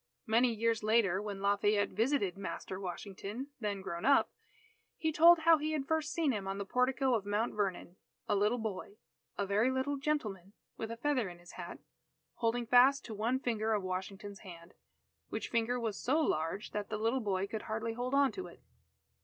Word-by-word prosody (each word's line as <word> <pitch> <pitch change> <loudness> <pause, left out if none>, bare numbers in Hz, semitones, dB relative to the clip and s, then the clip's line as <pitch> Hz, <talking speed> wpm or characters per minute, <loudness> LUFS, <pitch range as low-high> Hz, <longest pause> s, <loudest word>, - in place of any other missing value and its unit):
Many 235 +3 +3
years 230 0 0
later, 215 -3 +3
when 205 -2 -5
Lafayette 205 +1 +2
visited 220 -3 0
Master 190 -1 -5
Washington, 200 +7 -6
then 205 -3 -2
grown 170 -3 -5
up, 280 0 +4 0.7
he 320 - 0
told 335 +3 +8
how 325 -1 +6
he 310 +1 -1
had 290 -3 -1
first 315 -1 0
seen 320 -4 +1
him 200 -5 -3
on 195 0 -3
the 200 - -4
portico 255 +3 +1
of 220 -4 +1
Mount 205 +3 -1
Vernon, 190 -3 -2 0.3
a - - +2
little 210 +4 +2
boy, 210 -2 -5 0.4
a 200 - 0
very 205 +5 +2
little 260 +2 -1
gentleman, 215 - -2 0.2
with 220 - -5
a 230 - -5
feather 255 -5 0
in 175 - -10
his 175 +1 -14
hat, 175 -1 -7 0.6
holding 235 +1 0
fast 250 +3 +5
to 225 - -6
one 230 +5 0
finger 225 -3 0
of 205 -2 0
Washington's 190 +2 -5
hand, 170 -3 -12 0.6
which - - -4
finger 235 +1 0
was 220 -4 -3
so 280 +6 +1
large 165 - -1
that 210 -1 -4
the 215 - -2
little 225 +5 +1
boy 195 -3 0
could 215 +1 -5
hardly 220 +1 -2
hold 250 +3 -2
on 280 -1 +4
to 375 - -6
it. - - -14
220 Hz, 190 wpm, -33 LUFS, 200-255 Hz, 0.7 s, told